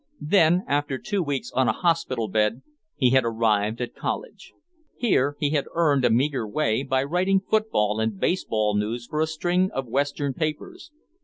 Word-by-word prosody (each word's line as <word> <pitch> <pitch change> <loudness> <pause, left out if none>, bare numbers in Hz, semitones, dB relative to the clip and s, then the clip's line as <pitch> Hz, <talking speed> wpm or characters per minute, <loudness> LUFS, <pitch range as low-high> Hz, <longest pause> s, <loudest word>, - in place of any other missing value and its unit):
Then, 175 +2 +4
after 145 -1 0
two 205 +5 -2
weeks 145 -5 -3
on 130 -1 +1
a - - +4
hospital 165 -9 0
bed, 105 +4 0 0.3
he 130 -4 +2
had 130 -1 +4
arrived 110 -1 0
at 120 - -4
college. - - -5 0.5
Here 145 - +1
he 145 -2 0
had 145 -3 0
earned 150 -5 +2
a - - +4
meager 130 -1 +1
way 110 -1 0
by 130 -1 0
writing 180 +6 +1
football 190 - 0
and 110 -3 -2
baseball 110 - 0
news 110 +4 -2
for 150 +5 -2
a 160 - +2
string 175 +4 0
of 135 - -2
western 140 +2 -1
papers. 165 - -5
140 Hz, 170 wpm, -24 LUFS, 115-165 Hz, 0.5 s, Then